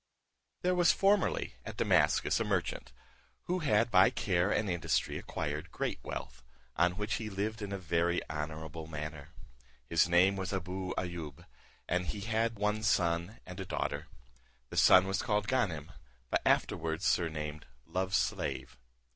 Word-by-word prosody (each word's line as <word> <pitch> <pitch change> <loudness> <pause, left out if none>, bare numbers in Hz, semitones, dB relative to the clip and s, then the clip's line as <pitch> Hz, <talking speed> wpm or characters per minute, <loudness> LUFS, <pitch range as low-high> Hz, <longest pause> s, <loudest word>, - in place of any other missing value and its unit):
There 180 0 +3
was 175 -1 +5
formerly 205 - +2
at - - -8
Damascus - - +3
a - - +1
merchant, - - -2 0.5
who 180 +1 -1
had 115 -6 +2
by 95 -1 +7
care 90 -1 +1
and 105 0 +1
industry 85 -3 0
acquired - - -4
great - - -2
wealth, - - -6 0.3
on 90 0 +3
which 105 +3 -2
he 110 - -4
lived 105 +3 -3
in 100 -1 -4
a 100 - -2
very 85 -1 +1
honourable 80 +1 -5
manner. 75 -2 -6 0.6
His 85 +6 +3
name 90 +3 +4
was 95 -1 -3
Abou 95 0 -3
Ayoub, 85 -6 -5 0.4
and 90 0 0
he 105 - -4
had 110 +1 0
one 105 +1 0
son 85 0 +1
and 90 +1 -9
a - - -2
daughter. - - -3 0.6
The - - -5
son 90 0 +7
was 95 0 -1
called 105 -3 0
Ganem, 90 - 0 0.4
but - - +2
afterwards 80 +1 +1
surnamed 75 -3 -1 0.2
Love's 95 +3 0
slave. - - -2
95 Hz, 150 wpm, -32 LUFS, 85-105 Hz, 0.6 s, by